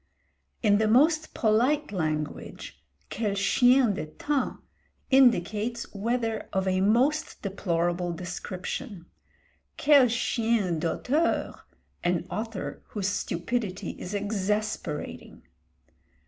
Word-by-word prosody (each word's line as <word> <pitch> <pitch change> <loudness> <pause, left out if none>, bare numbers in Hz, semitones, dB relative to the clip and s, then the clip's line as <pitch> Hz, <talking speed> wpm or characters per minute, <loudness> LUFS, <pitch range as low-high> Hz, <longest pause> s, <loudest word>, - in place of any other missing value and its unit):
In 205 -2 +4
the 220 - +2
most 305 +7 +3
polite 245 +7 +2
language, 155 - -4 0.3
quel 210 -2 -1
chien 245 +4 +4
de 155 -4 -4
temps 275 - -2 0.5
indicates 235 -2 +3
weather 225 +1 -2
of 190 0 0
a 185 0 +1
most 260 +10 +1
deplorable 175 -3 -1
description; 180 +1 -6 0.7
quel 285 -3 +6
chien 225 -6 0
d'auteur, 275 - 0 0.5
an 175 -1 0
author 225 -2 -4
whose 200 -2 -2
stupidity 200 +1 -2
is 190 +3 -5
exasperating. 210 +1 -3
210 Hz, 90 wpm, -27 LUFS, 185-245 Hz, 0.7 s, quel